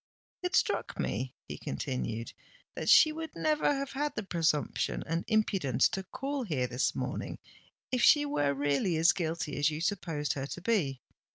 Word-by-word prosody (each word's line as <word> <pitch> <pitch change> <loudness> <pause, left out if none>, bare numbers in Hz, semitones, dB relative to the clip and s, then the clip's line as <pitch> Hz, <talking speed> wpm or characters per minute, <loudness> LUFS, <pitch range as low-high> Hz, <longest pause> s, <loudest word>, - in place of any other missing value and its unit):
"It 360 0 -1
struck - - 0
me," 130 0 -2
he - - -7
continued, 115 - -4 0.4
"that - - -3
she 310 - +8
would 320 +1 -6
never 305 -1 +2
have 275 -1 -2
had 290 +1 -2
the 215 - -3
presumption 165 -5 0
and 165 +1 -1
impudence 195 - +2
to 195 - -3
call 275 +8 -4
here 150 - -1
this 125 +1 0
morning, - - -3 0.5
if 255 -2 +1
she 295 +3 +6
were 145 - 0
really 145 +5 +1
as 165 +2 +6
guilty 160 -4 -3
as 145 +1 +3
you 155 0 -4
supposed 165 -5 -1
her 135 -1 -4
to 180 - -7
be. 165 - 0
165 Hz, 170 wpm, -30 LUFS, -, 0.5 s, she